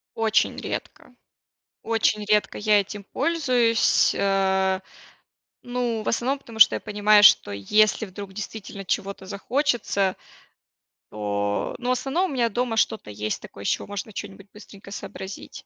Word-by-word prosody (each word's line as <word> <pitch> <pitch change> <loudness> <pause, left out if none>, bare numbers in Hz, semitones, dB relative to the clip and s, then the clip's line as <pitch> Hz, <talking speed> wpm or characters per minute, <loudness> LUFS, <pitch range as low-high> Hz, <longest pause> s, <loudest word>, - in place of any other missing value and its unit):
Очень 220 -1 +1
редко, - - -6 0.7
очень 220 -2 +1
редко 210 0 +1
я 210 -1 +4
этим 200 +1 -7
пользуюсь, 250 - +2
а, 190 -1 +1 0.8
ну, 245 -3 -2
в - - -8
основном 260 +4 0
потому, 230 -4 -12
что 215 - +8
я - - -2
понимаю, 210 0 +3
что 105 - +6
если 210 - +2
вдруг 195 0 -9
действительно 200 -1 -7
чего-то 195 -1 -3
захочется, 205 -2 0 1.0
то, 105 -1 -2
ну, 245 - -4
в - - +4
основном 290 +8 0
у - - -4
меня 240 -3 +1
дома 240 +1 -2
что-то 220 - 0
есть 105 +1 -3
такое, 100 - -11
из - - -3
чего - - 0
можно 205 +1 -6
чё-нибудь 200 0 -8
быстренько 200 -2 -13
сообразить. 195 -1 -8
210 Hz, 140 wpm, -24 LUFS, 195-230 Hz, 1.0 s, что